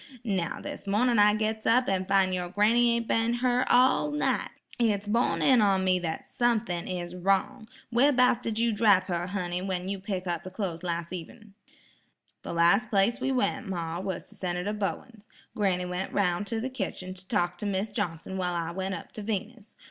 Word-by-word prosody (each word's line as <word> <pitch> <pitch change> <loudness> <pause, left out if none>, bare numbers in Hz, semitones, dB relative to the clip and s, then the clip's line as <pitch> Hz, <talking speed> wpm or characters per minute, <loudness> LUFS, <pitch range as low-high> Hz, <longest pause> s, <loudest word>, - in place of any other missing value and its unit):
Now, 190 -7 -2
this - - -8
mornin' 230 +3 +2
I 210 0 +6
gits 220 0 -2
up 250 +3 +4
an 190 -1 0
fin' 195 -1 +2
yer 180 -1 -2
granny 235 +5 +3
ain't 235 -1 -2
been 230 +1 +1
her 250 +1 +2
all 260 +4 +4
night. 295 0 0 0.3
It's 210 -4 +1
borne 230 +4 +1
in 255 -4 +5
on 195 -2 +3
me 185 -1 +2
that 165 -2 -4
sumthin' 225 -7 0
is 175 -1 -4
wrong. 195 +6 0 0.2
Where 255 +5 +4
'bouts 250 -2 +3
did 225 -3 -3
you 230 0 +2
drap 205 -3 +4
her, 175 0 -1
honey, 180 -2 -3
when 185 -1 -3
you 200 0 -3
picked 190 -2 -4 0.2
the 185 - -7
clos' 185 -4 -4
up - - -19
las' 170 0 -3
evenin'?" 190 +4 -9 0.9
"The - - -6
last 175 +8 +3
place 220 +3 +2
we 265 +1 0
went, 260 -1 0
ma, 170 -2 -3
was 190 0 -4
to - - -14
Senator 180 +2 -3
Bowens. 210 +1 -5 0.3
Granny 185 -4 +1
went 180 +1 -4
roun' 195 0 0
to 225 +2 -3
the 260 +4 -4
kitchen 190 -5 -5
to 185 0 -13
talk 175 -5 0
to 210 - -3
Mis' 200 +2 -1
Johnson 170 +1 -3
while 180 -1 -1
I 170 -1 -2
went 190 +1 -3
up 170 - -9
to 215 - -7
Venus. 215 +1 -5
200 Hz, 200 wpm, -28 LUFS, 180-230 Hz, 0.9 s, I